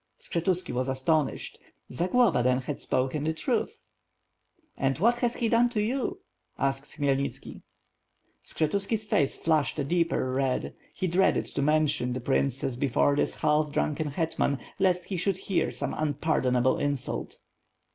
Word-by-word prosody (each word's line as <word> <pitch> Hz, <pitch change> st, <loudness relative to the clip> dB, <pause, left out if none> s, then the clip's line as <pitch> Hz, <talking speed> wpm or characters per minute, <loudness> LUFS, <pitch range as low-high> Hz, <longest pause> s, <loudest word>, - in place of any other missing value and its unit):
Skshetuski 175 Hz, -2 st, -1 dB
was 125 Hz, +1 st, -1 dB
astonished. 135 Hz, +2 st, 0 dB, 0.3 s
Zagloba 180 Hz, -, +3 dB
then 125 Hz, +1 st, +2 dB
had 135 Hz, +2 st, -5 dB
spoken 130 Hz, +3 st, 0 dB
the 160 Hz, +1 st, -1 dB
truth. 245 Hz, -, -2 dB, 0.9 s
"And 135 Hz, -1 st, 0 dB
what 235 Hz, +8 st, +3 dB
has 240 Hz, -1 st, 0 dB
he 235 Hz, -, 0 dB
done 235 Hz, +2 st, +4 dB
to 235 Hz, -3 st, -2 dB
you?" 245 Hz, +5 st, -1 dB, 0.4 s
asked 135 Hz, +1 st, -2 dB
Khmyelnitski 140 Hz, -1 st, -2 dB, 0.8 s
Skshetuski's 200 Hz, +7 st, -1 dB
face 145 Hz, -9 st, +1 dB
flushed 155 Hz, -3 st, +1 dB
a 145 Hz, -, 0 dB
deeper 165 Hz, -4 st, 0 dB
red. 130 Hz, -1 st, -1 dB, 0.2 s
He -, -, -2 dB
dreaded 185 Hz, +2 st, +2 dB
to 140 Hz, -, -1 dB
mention 150 Hz, -3 st, +2 dB
the 130 Hz, -, -3 dB
princess 135 Hz, 0 st, 0 dB
before 140 Hz, +2 st, +2 dB
this -, -, 0 dB
half 150 Hz, -1 st, +1 dB
drunken 150 Hz, +1 st, -1 dB
hetman, 145 Hz, -2 st, 0 dB, 0.2 s
lest 180 Hz, -2 st, +2 dB
he 190 Hz, -, -3 dB
should 185 Hz, +1 st, 0 dB
hear 190 Hz, -1 st, 0 dB
some -, -, -3 dB
unpardonable 130 Hz, -4 st, +1 dB
insult. 145 Hz, -3 st, -2 dB
150 Hz, 140 wpm, -28 LUFS, 135-180 Hz, 0.9 s, done